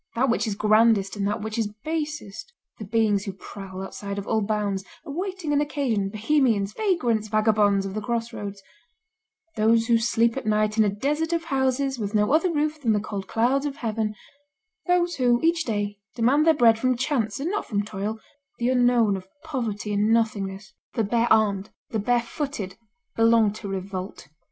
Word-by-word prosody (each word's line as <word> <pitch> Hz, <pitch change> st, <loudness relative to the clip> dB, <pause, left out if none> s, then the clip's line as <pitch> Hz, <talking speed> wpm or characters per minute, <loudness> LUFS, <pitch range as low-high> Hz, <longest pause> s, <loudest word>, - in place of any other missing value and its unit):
That 250 Hz, +1 st, +2 dB
which 235 Hz, -, 0 dB
is 210 Hz, -, -2 dB
grandest 215 Hz, -1 st, +3 dB
and 200 Hz, -1 st, -1 dB
that 210 Hz, +1 st, -2 dB
which 220 Hz, +1 st, -3 dB
is 210 Hz, -2 st, -1 dB
basest; 305 Hz, -, -4 dB, 0.3 s
the 215 Hz, -, -6 dB
beings 210 Hz, -1 st, +1 dB
who 195 Hz, -, -4 dB
prowl 190 Hz, 0 st, -8 dB
outside 200 Hz, +1 st, -6 dB
of 200 Hz, -, -4 dB
all 220 Hz, 0 st, +1 dB
bounds, 205 Hz, -2 st, -1 dB, 0.2 s
awaiting 350 Hz, +1 st, -3 dB
an 290 Hz, -, +3 dB
occasion, 260 Hz, -9 st, -1 dB
bohemians, 220 Hz, -2 st, +1 dB
vagrants, 245 Hz, -, 0 dB
vagabonds 210 Hz, -2 st, +2 dB
of 195 Hz, -, -5 dB
the 215 Hz, -, -3 dB
crossroads, 215 Hz, -3 st, -4 dB, 0.9 s
those 225 Hz, +1 st, +3 dB
who 230 Hz, -1 st, +3 dB
sleep 230 Hz, 0 st, +2 dB
at 270 Hz, -, -4 dB
night 215 Hz, 0 st, +2 dB
in 220 Hz, -, +5 dB
a 210 Hz, -, +2 dB
desert 295 Hz, +11 st, -1 dB
of 335 Hz, -1 st, 0 dB
houses 270 Hz, -3 st, 0 dB
with 210 Hz, 0 st, -3 dB
no 210 Hz, +3 st, +3 dB
other 330 Hz, +3 st, +3 dB
roof 305 Hz, 0 st, -1 dB
than 230 Hz, -5 st, +2 dB
the 210 Hz, -, +2 dB
cold 200 Hz, -2 st, -5 dB
clouds 265 Hz, +5 st, +1 dB
of 280 Hz, -, -5 dB
heaven, 220 Hz, -3 st, -2 dB, 0.7 s
those 350 Hz, -1 st, +2 dB
who, 245 Hz, -2 st, +3 dB
each 330 Hz, 0 st, +2 dB
day, 205 Hz, -2 st, -2 dB, 0.2 s
demand 265 Hz, +7 st, +3 dB
their 320 Hz, -, +6 dB
bread 230 Hz, -5 st, +5 dB
from 255 Hz, 0 st, +1 dB
chance 250 Hz, -5 st, -1 dB
and 315 Hz, +6 st, -2 dB
not 415 Hz, -, -2 dB
from 205 Hz, -2 st, 0 dB
toil, 210 Hz, +1 st, -4 dB, 0.4 s
the 240 Hz, +1 st, 0 dB
unknown 245 Hz, -4 st, +3 dB
of 185 Hz, -1 st, -7 dB, 0.2 s
poverty 225 Hz, -9 st, -3 dB
and 205 Hz, +2 st, +2 dB
nothingness, 200 Hz, -4 st, -1 dB, 0.2 s
the 225 Hz, -, +1 dB
bare 235 Hz, +3 st, +1 dB
armed, 210 Hz, -2 st, +3 dB, 0.2 s
the 220 Hz, -, -1 dB
bare 240 Hz, +3 st, +1 dB
footed, 235 Hz, -, -5 dB, 0.4 s
belong 225 Hz, -2 st, +4 dB
to 215 Hz, -1 st, -8 dB
revolt. 190 Hz, -3 st, -5 dB
225 Hz, 180 wpm, -25 LUFS, 205-265 Hz, 0.9 s, their